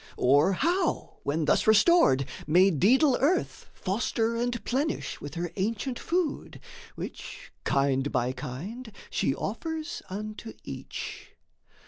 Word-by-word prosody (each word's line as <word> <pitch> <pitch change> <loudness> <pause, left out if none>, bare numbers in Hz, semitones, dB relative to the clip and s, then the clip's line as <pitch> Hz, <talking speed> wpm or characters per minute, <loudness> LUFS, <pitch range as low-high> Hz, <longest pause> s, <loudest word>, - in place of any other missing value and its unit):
Or 145 +9 +4
how, 340 - 0
when 150 +2 -1
thus - - +2
restored, 220 - +5 0.2
may 180 +5 +5
daedal 250 - +4
Earth 315 +7 0
Foster 225 +3 -1
and 235 -2 -2
plenish 280 +6 -2
with 145 +3 -7
her 170 0 -3
ancient 230 +6 -2
food, 345 -4 -2 0.4
Which, - - -8
kind 140 -1 +1
by 125 -1 +1
kind, 160 - -7 0.2
she 135 - +1
offers 315 - -4
unto 215 +3 -6
each? - - -7
210 Hz, 115 wpm, -28 LUFS, -, 0.4 s, restored